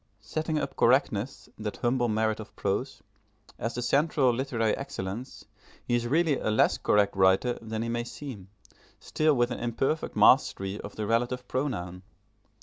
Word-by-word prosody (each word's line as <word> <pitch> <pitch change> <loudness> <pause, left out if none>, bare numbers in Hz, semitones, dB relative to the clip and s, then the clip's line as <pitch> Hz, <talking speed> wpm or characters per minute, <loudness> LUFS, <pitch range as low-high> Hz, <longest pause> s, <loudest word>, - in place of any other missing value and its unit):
Setting 155 +7 -2
up 140 -2 -3
correctness, 125 -1 +1
that 105 -1 -4
humble 120 0 +1
merit 110 0 0
of 110 - -10
prose, 125 +8 -2 0.6
as 115 +2 -3
the 125 - -2
central 140 -1 +2
literary 115 -3 0
excellence, 125 -3 -6 0.4
he 120 - -2
is 120 0 +1
really 155 +1 +2
a - - -1
less 110 - +3
correct 105 -1 +2
writer 95 +6 +3
than 110 0 -4
he - - -3
may 120 0 -1
seem, 120 -8 -8 0.5
still 155 -1 +1
with 120 0 +1
an - - -4
imperfect 120 +6 -1
mastery 95 +1 +4
of 100 - -9
the 105 - -3
relative 120 +3 0
pronoun. 90 -10 -3
120 Hz, 155 wpm, -28 LUFS, 110-135 Hz, 0.6 s, mastery